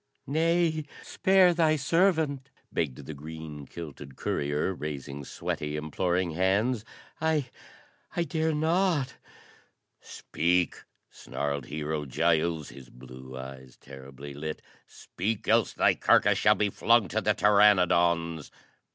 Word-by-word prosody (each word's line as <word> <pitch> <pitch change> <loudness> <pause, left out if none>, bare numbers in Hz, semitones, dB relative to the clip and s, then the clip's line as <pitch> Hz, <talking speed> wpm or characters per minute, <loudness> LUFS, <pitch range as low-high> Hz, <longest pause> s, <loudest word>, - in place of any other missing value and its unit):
"Nay, 160 +1 +1 0.2
spare 190 -2 +4
thy 160 -2 +3
servant!" 155 -2 +1 0.2
begged 70 -3 -2
the 80 - -6
green 75 -1 -9
kilted 75 -4 -9
courier, 75 +8 -1
raising 70 -3 -6
sweaty, 75 -1 -4
imploring 85 +4 -1
hands. 100 +7 +1 0.4
"I 155 -5 0 0.6
I 170 - +1
dare 160 -1 -1
not 160 -3 +1 0.4
" - - -42 0.2
"Speak!" 90 +2 +1 0.3
snarled 70 -3 -4
Hero 75 0 -3
Giles, 80 +2 +1
his 65 -2 -13
blue 65 +1 -11
eyes 65 -1 -10
terribly 70 +1 -11
lit. 75 +2 -6 0.2
"Speak! 110 +3 -4
else 115 -1 +3
thy - - +3
carcass - - +3
shall - - +5
be 105 -1 0
flung 115 -1 +3
to 110 +4 -1
the 105 0 +1
pteranodons." 85 -6 +3
85 Hz, 115 wpm, -28 LUFS, -, 0.6 s, shall